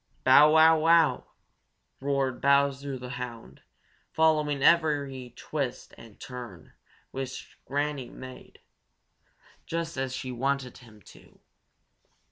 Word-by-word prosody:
"Bow, 145 +4 +7
wow, 160 0 +6
wow!" 160 -4 +3 0.7
roared 135 -2 -1
Bowser 140 -1 +1
the 125 0 -7
Hound, 115 - -9 0.5
following 150 -3 +1
every 140 -7 +2
twist 140 -5 -5
and 115 -3 -16
turn 120 -8 -10 0.4
which 130 -1 -7
Granny 145 -2 -2
Fox - - -15
made, 130 0 -12 1.1
just 165 -2 -4
as 130 -1 -2
she 130 0 -5
wanted 130 +1 -2
him 110 -5 -18
to. - - -18
135 Hz, 105 wpm, -27 LUFS, 125-150 Hz, 1.1 s, Bow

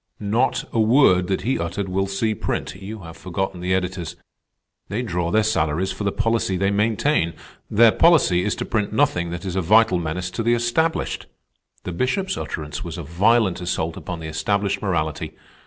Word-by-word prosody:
"Not 110 +6 +1
a 115 - +1
word 110 -6 +4
that 95 -1 -1
he 125 +7 0
uttered 90 +4 -3
will 95 +1 -1
see 110 +3 0
print. 105 - -3
You 100 +3 -8
have 80 -2 -10
forgotten 95 0 -4
the 90 +1 +1
editors. 90 -2 -3 0.7
They 115 +5 -2
draw 90 -6 -2
their 110 +5 +3
salaries 90 -4 0
for - - -5
the 100 - +1
policy 115 -4 0
they 100 +2 +1
maintain. 105 - +1 0.3
Their 115 +1 +6
policy 155 - +4
is 105 - 0
to - - -4
print 105 -3 -1
nothing 85 -5 +1
that 85 +2 -6
is 95 -1 -3
a 95 - +1
vital 105 +1 +4
menace 90 +2 -3
to 115 - -3
the 120 +1 +3
established. 135 +8 0 0.6
The 90 - -4
Bishop's 155 - -1
utterance 75 -1 -5
was 85 0 -6
a 85 - -5
violent 95 +4 +2
assault 85 -2 -2
upon 90 -2 -6
the 80 - -6
established 100 +5 -1
morality. 80 -7 -2
95 Hz, 185 wpm, -22 LUFS, 85-110 Hz, 0.7 s, Their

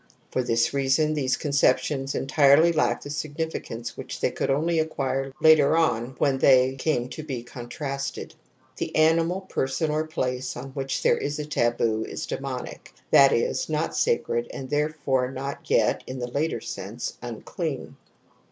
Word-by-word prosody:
For 130 - +1
this 115 0 +1
reason 140 +3 +2
these 135 -4 0
conceptions 140 -1 +1
entirely 145 +4 +5
lack 160 - +1
the 145 - -7
significance 150 -6 -4
which - - -7
they - - +1
could - - -2
only 160 +4 +1
acquire 135 -3 -1
later 160 -1 +6
on 130 -6 +1
when 135 -2 +1
they 130 -1 +5
came 135 -2 -1
to 155 - -7
be 130 -6 -5
con 120 0 -9
tra 140 +1 -4
sted. 140 0 -5 0.4
The - - -4
animal, 165 +4 +3
person 150 -4 -1
or 155 +1 -1
place 125 -4 -3
on 130 +3 -7
which 135 0 -3
there - - +3
is 145 +1 -3
a 150 - -4
taboo 120 -5 +1
is - - -5
demonic, - - -6 0.2
that 140 -1 +7
is, 115 - 0
not 155 +1 -1
sacred, 470 0 0
jgind 130 -1 -7
therefore 145 -3 0
n 130 0 -8
ot 140 +1 -6
yet, - - +2
in 130 - -5
the 120 -1 -5
later 155 +5 -1
sense, - - -6
unclean. - - -5
140 Hz, 165 wpm, -25 LUFS, 130-155 Hz, 0.4 s, that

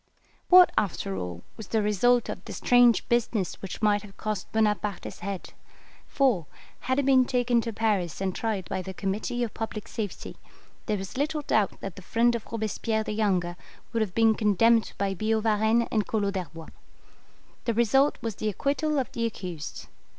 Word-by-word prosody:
"What, 365 0 +8
after 180 - -3
all, 90 -2 -5
was 220 - -8
the 220 -2 0
result 235 +4 +3
of - - -6
this - - -7
strange 245 -2 +4
business 230 -5 0
which 195 +3 -7
might 205 -1 +3
have 200 -1 -14
cost 215 -3 -4
Bonaparte 210 -3 0
his - - -8
head? 195 -1 -6 0.5
for, 240 - +1 0.3
had 260 0 -1
he 285 - +2
been 265 -1 +5
taken 245 -2 +2
to 230 - -4
Paris 205 -6 0
and 190 -1 -1
tried 210 -5 -2
by 190 -1 -2
the 190 0 -7
Committee 215 +5 -2
of 230 - -3
Public 220 -2 -5
Safety, 210 -5 -6 0.5
there 210 -2 0
is 190 +4 -7
little 300 +1 -1
doubt 215 -7 +1
that 195 -2 -6
the - - -8
friend 235 +5 +2
of 235 -2 -4
Robespierre 220 0 -1
the - - -4
younger 190 -5 0 0.4
would 230 - +1
have 200 -4 -2
been 225 -1 +5
condemned 220 +2 +3
by 195 -1 0
Billaud 215 +3 0
Varennes 220 +2 +2
and 215 -3 0
Collot 205 -3 0
d'Herbois. 165 -4 -6 1.0
The 235 - 0
result 270 +5 +3
was 225 -2 -2
the 215 - -1
acquittal 290 - -1
of 265 - -1
the 230 0 -1
accused. 180 -8 -7
215 Hz, 180 wpm, -27 LUFS, 195-235 Hz, 1.0 s, What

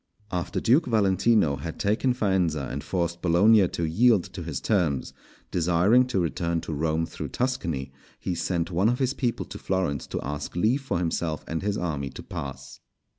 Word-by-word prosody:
After 90 -2 -2
Duke 130 +8 +3
Valentino 100 - +3
had 80 +4 -6
taken 110 +5 +1
Faenza 90 - +1
and - - -4
forced 85 -2 -2
Bologna 95 +4 +5
to 85 - -4
yield 105 +3 +4
to 90 - -6
his 80 -5 -4
terms, 85 -11 0 0.4
desiring 90 +9 +3
to 125 -7 0
return 85 0 -1
to 80 - -5
Rome 80 +2 0
through - - -6
Tuscany, 85 - -2 0.3
he 90 - -2
sent 85 +1 -1
one 95 +6 +3
of 120 - +1
his 130 0 0
people 120 -4 -2
to - - -9
Florence 90 -8 -1
to - - -3
ask 75 +2 -5
leave 115 +10 +2
for 135 - -2
himself 85 -2 -2
and 80 0 -3
his 105 +1 -1
army 75 -6 -2
to - - -9
pass. 65 -1 -7
90 Hz, 175 wpm, -26 LUFS, 80-110 Hz, 0.4 s, Bologna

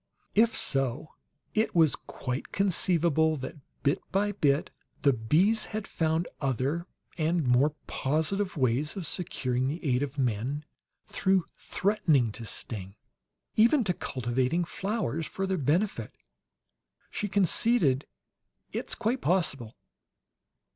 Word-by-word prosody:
If 225 +2 +3
so, 135 +1 -1 0.4
it 220 -2 +1
was 160 -4 +5
quite 125 0 -5
conceivable 170 -5 +3
that, 135 +4 -6 0.3
bit 140 - +2
by 205 +2 +1
bit, 145 -7 +1 0.3
the 140 - +5
bees 165 - +2
had 215 - -4
found 160 +1 0
other 140 +6 -1 0.3
and 165 0 +1
more 130 +5 +3
positive 160 +7 -1
ways 130 +3 +1
of 190 -4 -4
securing 130 -7 -1
the 160 +5 -4
aid 125 -2 +2
of 145 0 -3
men 130 +4 -1 0.4
through 190 -2 +1
threatening 165 - +1
to 115 +2 -8
sting. 100 -3 -6 0.6
"Even 235 +5 +5
to 185 - 0
cultivating 130 +5 -1
flowers 190 - -2
for 195 - -3
their 190 -2 -1
benefit," 170 +9 0 1.0
she 210 - -2
conceded. 185 - +3 0.6
"It's - - -1
quite 235 +3 -1
possible." 145 - 0
155 Hz, 120 wpm, -28 LUFS, 130-190 Hz, 1.0 s, was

